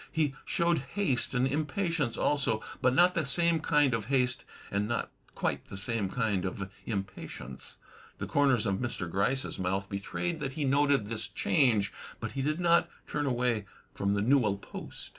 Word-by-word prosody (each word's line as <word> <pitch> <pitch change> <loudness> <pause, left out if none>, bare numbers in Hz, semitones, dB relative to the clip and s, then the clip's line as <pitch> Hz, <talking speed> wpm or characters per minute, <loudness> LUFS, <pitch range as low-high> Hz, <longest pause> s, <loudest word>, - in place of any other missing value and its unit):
He 150 -4 +1
showed 170 -1 +2
haste 135 -2 0
and 125 +1 +3
impatience 155 - 0
also, 125 -7 +1 0.2
but 130 -1 +3
not 180 +1 +6
the 170 - +1
same 170 +3 +2
kind 150 -4 +3
of 110 -3 -1
haste 125 -1 +1 0.3
and 100 +1 0
not 120 - -2 0.2
quite - - -1
the - - -7
same 105 -1 -1
kind 105 -4 0
of 95 +1 -4 0.2
impatience. 95 - -6 0.4
The - - -3
comers 135 -6 +3
of 100 -2 +1
Mr. 120 -6 -3
Gryce's 100 +10 0
mouth 95 +1 -1
betrayed 155 - -3
that 135 -3 -3
he 145 0 -1
noted 140 -3 +3
this 110 -1 -3
change, 110 0 +2 0.3
but - - -4
he 135 - -3
did 155 +4 0
not 170 -1 +4 0.2
turn 145 -1 -1
away 120 -5 0 0.3
from 100 0 0
the 100 - +1
newel 115 -5 +3
post. - - -8
125 Hz, 170 wpm, -30 LUFS, 100-145 Hz, 0.4 s, not